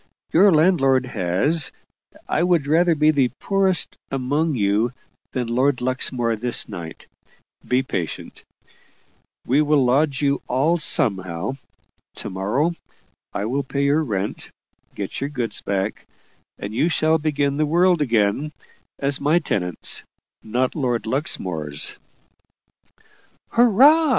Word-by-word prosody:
Your 195 +5 +6
landlord 150 -6 +3
has 130 - +1 0.6
I - - 0
would 175 -4 +2
rather 165 +3 +3
be 150 +1 +4
the 140 -4 +2
poorest 195 -3 0
among 140 +4 -1
you 105 +2 +1 0.4
than 125 -2 -2
Lord 125 +3 +1
Luxmore 125 -2 0
this 120 +2 0
night. 80 -2 -8 0.6
Be 125 +1 +2
patient; 90 - -5 1.0
we'll 140 +5 +3 0.2
lodge 135 +2 +2
you 140 -1 +1
all 155 +7 +1
somehow. 95 - 0 0.6
To - - -6
morrow 110 - 0 0.6
I 100 - -3
will 130 +5 -1
pay 140 +1 -3
your 145 +3 +2
rent 100 -6 -4 0.5
get - - -5
your 140 - -2
goods 120 -7 -3
back 100 +1 -3 0.5
and 100 +1 -6
you 155 +9 +1
shall 160 -1 +2
begin 145 -2 0
the 155 0 +1
world 175 +1 +3
again, 120 +3 +1 0.4
as 140 0 -1
my 150 +4 +3
tenants, 90 - -1 0.4
not 125 +4 -1
Lord 125 -6 -1
Luxmore's." 90 - -2 1.5
"Hurrah!" 270 +8 +5
135 Hz, 120 wpm, -22 LUFS, 115-155 Hz, 1.5 s, Your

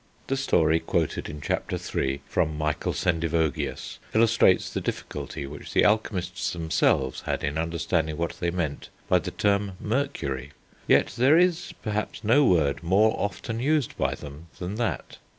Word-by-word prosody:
The 135 - -1
story 80 -11 +3
quoted - - -1
in 75 0 -7
Chapter - - -2
III., 70 +1 -2
from 75 -1 0
Michael 75 -1 -1
Sendivogius, 80 -3 -1 0.2
illustrates 110 -4 +4
the - - -2
difficulty 70 - -5
which 70 +1 -9
the - - +4
alchemists 90 -4 0
themselves 80 -5 +1
had - - -1
in 70 0 -1
understanding 80 -1 -1
what 85 0 -1
they 85 - 0
meant 85 -5 -3 0.2
by - - +4
the - - -5
term 100 -1 0
Mercury; 105 - -2 0.3
yet - - +4
there 130 +6 +5
is 175 -1 +2
perhaps 105 0 -3
no 120 +7 +5
word 75 - +2
more 100 +6 +3
often 100 +3 -3
used 145 0 +1
by - - 0
them 75 +3 -10
than 90 +2 -4
that. 120 -2 -3
90 Hz, 150 wpm, -26 LUFS, 80-110 Hz, 0.3 s, there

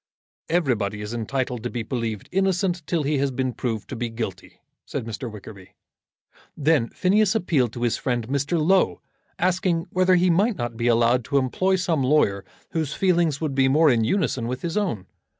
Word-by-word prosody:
"Everybody 120 - 0
is 105 +2 -5
entitled 125 +1 -2
to - - -3
be 120 -2 -4
believed 115 -3 -4
innocent 190 -1 +1
till 165 -4 0
he 145 0 0
has 140 0 +1
been 130 -1 -2
proved 115 -2 -3
to - - -5
be 120 0 -3
guilty," 110 -5 -6 0.2
said - - -5
Mr. 115 +2 -5
Wickerby. 100 -3 -12 0.8
Then 150 -5 +2
Phineas 205 +3 +2
appealed 150 - +1
to 120 - -5
his 120 - +1
friend 120 -4 -2
Mr. 140 +5 0
Low, 185 +5 +2 0.4
asking 180 -2 +1
whether 185 0 +3
he 180 0 +3
might 205 +6 +2
not 120 -1 -3
be 115 +1 -1
allowed 120 +1 +3
to 140 - 0
employ 185 +9 +1
some 175 -5 0
lawyer 125 -8 +2 0.3
whose 155 -3 -2
feelings 170 -6 +2
would 155 -4 -2
be 135 0 +3
more 150 +2 +5
in 115 -2 +2
unison 120 - 0
with 125 +1 -4
his 170 -1 -3
own. 180 - -1
135 Hz, 185 wpm, -24 LUFS, 115-175 Hz, 0.8 s, more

